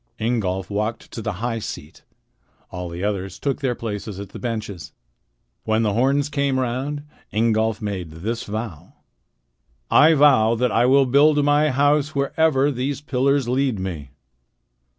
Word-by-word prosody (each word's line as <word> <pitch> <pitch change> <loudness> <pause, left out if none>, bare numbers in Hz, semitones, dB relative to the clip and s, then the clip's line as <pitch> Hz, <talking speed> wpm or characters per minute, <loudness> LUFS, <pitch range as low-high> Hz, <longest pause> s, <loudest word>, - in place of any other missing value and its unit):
Ingolf 100 -5 -1
walked 105 +3 -3
to 115 - -6
the 105 -1 -3
high 115 -2 -1
seat. 80 -7 -8 0.7
All 90 -1 -5
the 85 +2 -6
others 95 -3 -2
took 140 -2 -2
their 130 -3 0
places 105 -3 -5
at 100 -2 -7
the - - -10
benches. 105 - -5 0.7
When 110 +1 +1
the 105 -2 +1
horns 135 +5 +2
came 140 -2 0
round, 130 +4 -2 0.3
Ingolf 110 0 +1
made 95 -5 -4
this 105 +10 -4
vow: 105 -6 -6 1.0
"I 160 +2 +6
vow 130 -6 +5
that 125 +2 0
I 120 +2 +3
will 135 +1 +5
build 145 +3 +4
my 145 +1 +3
house 145 +2 +2
wherever 140 0 +2
these 135 +2 -2
pillars 140 -1 +1
lead 130 -2 0
me." 85 -7 -5
120 Hz, 150 wpm, -22 LUFS, 105-140 Hz, 1.0 s, I